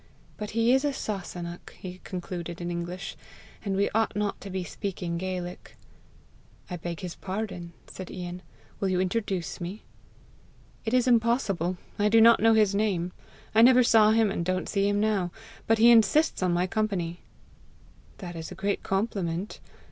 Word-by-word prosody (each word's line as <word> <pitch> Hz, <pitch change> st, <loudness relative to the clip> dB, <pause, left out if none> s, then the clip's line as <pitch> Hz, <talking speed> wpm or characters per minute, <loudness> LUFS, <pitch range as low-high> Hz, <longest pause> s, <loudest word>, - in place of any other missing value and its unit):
But 210 Hz, -1 st, -5 dB
he 230 Hz, +2 st, +4 dB
is 265 Hz, +1 st, +3 dB
a 290 Hz, -1 st, +1 dB
Sasunnach," 175 Hz, -7 st, -5 dB
he 185 Hz, 0 st, -8 dB
concluded 175 Hz, -2 st, -5 dB
in 175 Hz, 0 st, -3 dB
English, 175 Hz, +2 st, -5 dB, 0.5 s
"and 195 Hz, -3 st, -1 dB
we 200 Hz, +1 st, +2 dB
ought 220 Hz, -1 st, +1 dB
not 205 Hz, -1 st, -2 dB
to 200 Hz, -, -7 dB
be 190 Hz, -1 st, -3 dB
speaking 175 Hz, 0 st, -4 dB
Gaelic." 180 Hz, -1 st, -5 dB, 1.0 s
"I 180 Hz, -, -3 dB
beg 170 Hz, 0 st, -5 dB
his 180 Hz, -2 st, -5 dB
pardon," 185 Hz, -3 st, -5 dB
said 185 Hz, -, -9 dB
Ian. 180 Hz, 0 st, -6 dB, 0.4 s
"Will 195 Hz, -, 0 dB
you 185 Hz, -1 st, +1 dB
introduce 190 Hz, -2 st, -2 dB
me?" 185 Hz, +5 st, -6 dB, 1.0 s
"It 225 Hz, +2 st, +1 dB
is 250 Hz, 0 st, +3 dB
impossible; 225 Hz, -7 st, +2 dB, 0.2 s
I 210 Hz, +1 st, +3 dB
do 225 Hz, +1 st, +6 dB
not 230 Hz, +1 st, +7 dB
know 225 Hz, +1 st, +5 dB
his 210 Hz, -2 st, +4 dB
name. 195 Hz, -4 st, 0 dB, 0.4 s
I 220 Hz, -, +6 dB
never 250 Hz, +1 st, +7 dB
saw 220 Hz, -2 st, +6 dB
him, 220 Hz, -2 st, +3 dB
and 180 Hz, -, -2 dB
don't 185 Hz, +1 st, -1 dB
see 200 Hz, -1 st, +1 dB
him 205 Hz, 0 st, +1 dB
now. 205 Hz, -4 st, +1 dB, 0.4 s
But 225 Hz, -, +4 dB
he 230 Hz, +2 st, +7 dB
insists 230 Hz, +7 st, +4 dB
on 180 Hz, -1 st, +2 dB
my 175 Hz, +1 st, +2 dB
company." 185 Hz, -4 st, -2 dB, 1.0 s
"That 175 Hz, -3 st, -7 dB
is 160 Hz, -1 st, -6 dB
a -, -, -7 dB
great 200 Hz, +1 st, -1 dB
compliment. 195 Hz, -2 st, -2 dB
195 Hz, 170 wpm, -27 LUFS, 180-220 Hz, 1.0 s, not